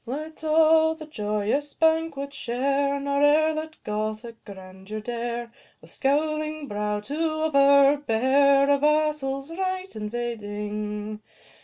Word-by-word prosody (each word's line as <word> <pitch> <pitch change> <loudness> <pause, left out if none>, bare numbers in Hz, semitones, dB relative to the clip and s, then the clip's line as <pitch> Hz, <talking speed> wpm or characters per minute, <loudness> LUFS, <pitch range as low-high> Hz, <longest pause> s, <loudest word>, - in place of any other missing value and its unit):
Let 310 +5 -6
all 320 0 +4
the 315 -1 -10
joyous 215 +2 -2
banquet 320 -3 0
share, 275 +3 -1
Nor 280 0 -1
e'er 310 +2 +4
let 315 0 -5
Gothic 215 +2 -4
grandeur 190 +1 -9
dare, 235 +1 -4 0.3
With - - -13
scowling 305 +1 -1
brow, 210 -1 -2
to 275 +8 -6 0.3
overbear, 280 -2 +4
A 280 - +3
vassal's 300 -1 0
right 370 -2 -3
invading. 210 -1 -5
275 Hz, 110 wpm, -25 LUFS, 215-305 Hz, 0.3 s, all